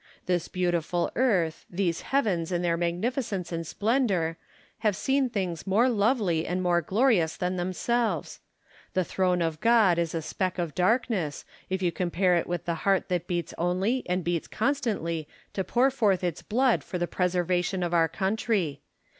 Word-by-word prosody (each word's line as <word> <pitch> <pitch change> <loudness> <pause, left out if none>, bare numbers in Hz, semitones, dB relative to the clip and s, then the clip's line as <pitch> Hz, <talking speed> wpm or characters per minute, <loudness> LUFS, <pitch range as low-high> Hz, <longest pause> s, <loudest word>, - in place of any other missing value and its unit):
This 175 -2 0
beautiful 175 -1 0
earth, 185 -11 +1
these 175 -2 -1
heavens 195 -12 0
in 175 0 0
their 170 -1 +2
magnificence 185 +3 -2
and 165 -1 -3
splendour, 205 - +1 0.4
have 215 -3 +1
seen 270 +2 +1
things 185 -6 -3
more 220 +7 +4
lovely 205 -7 +1
and 180 +1 -1
more 175 -1 +2
glorious 190 - +2
than 180 +1 -1
themselves. 185 - -1 0.6
The 185 - +3
throne 180 0 +1
of 160 -2 -2
God 220 -6 +4
is 170 -1 -1
a 165 - -2
speck 185 +4 -2
of 170 -4 -2
darkness, 185 - 0 0.2
if 190 0 -2
you 175 - +2
compare 180 +1 +1
it 170 - 0
with 175 -2 -3
the 170 - 0
heart 195 -1 +1
that 175 -1 -1
beats 175 -3 -2
only 190 +9 +1
and 180 0 0
beats 170 -1 -1
constantly 215 - -1 0.3
to 190 - -1
pour 245 +8 +2
forth 205 -8 +1
its 175 -3 -2
blood 250 +3 +2
for 180 - -4
the 175 - 0
preservation 180 +1 0
of 175 0 -2
our 165 -1 +4
country 190 - -1
180 Hz, 165 wpm, -27 LUFS, 170-215 Hz, 0.6 s, more